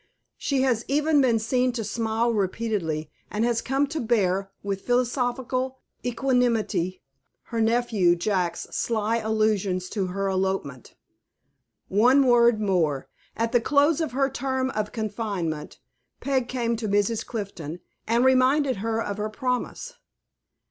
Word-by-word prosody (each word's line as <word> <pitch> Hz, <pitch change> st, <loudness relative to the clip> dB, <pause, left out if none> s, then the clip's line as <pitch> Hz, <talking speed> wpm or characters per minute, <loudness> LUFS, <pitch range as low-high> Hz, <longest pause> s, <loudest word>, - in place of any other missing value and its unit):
She 270 Hz, -2 st, 0 dB
has 240 Hz, -4 st, +1 dB
even 295 Hz, +1 st, +3 dB
been 245 Hz, -4 st, +3 dB
seen 250 Hz, +3 st, +1 dB
to 235 Hz, -2 st, -3 dB
smile 225 Hz, +2 st, 0 dB
repeatedly, 185 Hz, -7 st, -2 dB, 0.2 s
and 215 Hz, +2 st, 0 dB
has 235 Hz, -1 st, +1 dB
come 270 Hz, +2 st, +1 dB
to 315 Hz, +1 st, -3 dB
bear, 195 Hz, -5 st, +1 dB
with 195 Hz, -1 st, -3 dB
philosophical 250 Hz, +1 st, 0 dB, 0.3 s
equanimity, 240 Hz, -7 st, 0 dB, 0.4 s
her 230 Hz, -1 st, -3 dB
nephew 225 Hz, -6 st, +3 dB
Jack's 175 Hz, -2 st, -1 dB
sly 225 Hz, 0 st, 0 dB
allusions 215 Hz, -4 st, 0 dB
to 195 Hz, -4 st, -2 dB
her 195 Hz, +2 st, -2 dB
elopement. 190 Hz, -9 st, -2 dB, 0.9 s
One 250 Hz, +8 st, +4 dB
word 235 Hz, -2 st, +5 dB
more. 170 Hz, -9 st, 0 dB, 0.3 s
At 230 Hz, 0 st, 0 dB
the 240 Hz, -, +3 dB
close 290 Hz, +5 st, +3 dB
of 315 Hz, -6 st, -2 dB
her 270 Hz, +1 st, +2 dB
term 260 Hz, -1 st, -2 dB
of 210 Hz, -2 st, -2 dB
confinement, 200 Hz, -8 st, -3 dB, 0.4 s
Peg 260 Hz, -2 st, 0 dB
came 235 Hz, -2 st, -1 dB
to 220 Hz, -1 st, -3 dB
Mrs. 205 Hz, +2 st, +1 dB
Clifton, 180 Hz, -8 st, -6 dB, 0.3 s
and 235 Hz, +3 st, +3 dB
reminded 260 Hz, 0 st, +3 dB
her 225 Hz, +2 st, -1 dB
of 205 Hz, 0 st, -4 dB
her 210 Hz, +1 st, -2 dB
promise. 250 Hz, -, -3 dB
225 Hz, 135 wpm, -25 LUFS, 195-255 Hz, 0.9 s, word